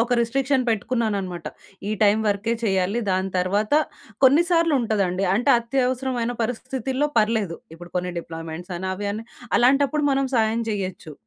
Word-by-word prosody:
ఒక 235 - -3
రిస్ట్రిక్షన్ 265 +3 +1
పెట్టుకున్నాననమాట. 205 -6 -1 0.4
ఈ - - -1
టైమ్ 210 +1 +4
వరకే 205 +3 0
చేయాలి 195 0 +1
దాని 190 0 0
తర్వాత 200 +5 0 0.5
కొన్నిసార్లు 330 +3 +4
ఉంటదండి. 195 -5 0
అంటే 245 +7 +2
అత్యవసరమైన 250 0 -1
పరిస్థితుల్లో 260 +4 -2
పర్లేదు. 215 -5 +1 0.2
ఇప్పుడు 175 +1 -12
కొన్ని 180 0 -2
డిప్లాయిమెంట్స్ 165 +2 -7
అఅని 190 +2 -4
అవని 205 +3 -4 0.3
అలాంటప్పుడు 280 +4 +3
మనం 275 0 +2
సాయం 225 0 +2
జేయొచ్చు. 190 -6 -4
220 Hz, 130 wpm, -23 LUFS, 190-255 Hz, 0.5 s, టైమ్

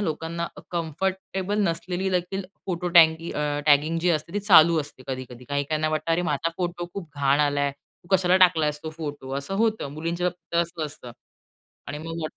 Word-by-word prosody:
लोकांना 170 -1 -2 0.2
कम्फर्टेबल 190 +4 -2
नसलेली 180 +1 -1
देखील 185 +2 -1 0.2
फोटो 180 -1 -2
टॅगी 160 0 +6
अं, 145 -1 -1
टॅगिंग 150 +3 +4
जी 175 +1 +2
असते 160 +2 -1
ती 205 - 0
चालू 170 -5 +6
असते 145 -3 -9
कधी-कधी. 130 -1 -6
काही-काहीना 150 +2 0
वाटतं, 155 +1 -2
"अरे 175 +2 +1
माझा 150 +3 0
फोटो 175 -1 -3
खूप 185 -5 -6
घाण 140 +1 +2
आलाय, 145 -1 +2
तू 140 +4 -28
कशाला 180 0 +3
टाकलायस 150 -4 -1
तो 160 - -5
फोटो?" 145 -4 -6
असं 140 +8 -5
होतं. 220 -10 -1
मुलींच्या 170 +3 -2
बाबतीत 175 -1 -13
तर - - +5
असंच 165 -2 -5
असतं 125 -4 -10 0.8
आणि 145 +1 -5
मग 165 +1 -6
165 Hz, 175 wpm, -25 LUFS, 150-175 Hz, 0.8 s, टॅगी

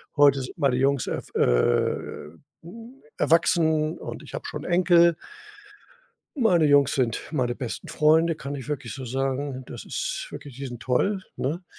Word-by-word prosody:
Heute 140 -2 +5
sind 125 - -8
meine 135 -3 +2
Jungs 135 0 +1
erw - - -5
äh, 60 +5 0 0.3
hm, 230 +9 -12 0.2
erwachsen 160 -1 +2
und - - -7
ich - - -13
habe - - -6
schon - - -6
'n - - -4
Enkel. 170 -2 +5 1.2
Meine 180 - +4
Jungs 145 -1 +4
sind 120 -4 0
meine 125 -5 0
besten 120 -2 -6
Freunde, 160 +2 +3
kann 140 -2 -6
ich 140 0 -7
wirklich 135 -6 -4
so 130 -2 -7
sagen. 135 +1 -2
Das - - -9
ist - - -3
wirklich 140 -3 -9
die 135 +1 -5
sind 120 -2 -8
toll, 190 +10 0
ne? 160 +8 -3
145 Hz, 165 wpm, -25 LUFS, 130-165 Hz, 1.2 s, Heute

